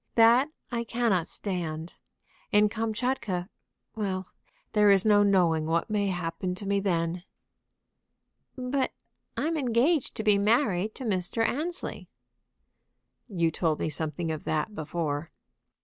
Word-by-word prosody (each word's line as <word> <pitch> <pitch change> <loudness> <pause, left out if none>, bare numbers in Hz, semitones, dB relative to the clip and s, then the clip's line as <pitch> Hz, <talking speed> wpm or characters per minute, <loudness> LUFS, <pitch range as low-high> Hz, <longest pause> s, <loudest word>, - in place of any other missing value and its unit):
That 235 +5 +6 0.2
I 235 -1 -1
cannot 225 -7 +1
stand. 170 -5 -4 0.6
In 210 0 +5
Kamtchatka 220 -4 -2 0.5
Well, 190 -3 -2 0.5
there 210 -1 +5
is 195 0 +5
no 205 -1 +6
knowing 175 -6 +3
what 165 +5 0
may 205 -1 +1
happen 180 0 -2
to 200 - -4
me 200 0 +1
then." 175 -2 -1 1.3
"But 255 +1 -1 0.4
I'm 325 +2 0
engaged 265 +2 +1
to 220 - -3
be 210 -2 +4
married 210 -2 +2
to 265 - -7
Mr. 210 +1 0
Annesley." 335 +6 -4 1.2
"You 170 -7 +1
told 160 -1 0
me - - -1
something 160 +2 -2
of 155 - -4
that 160 +7 -1
before." 155 -2 -3
200 Hz, 125 wpm, -28 LUFS, 170-230 Hz, 1.3 s, That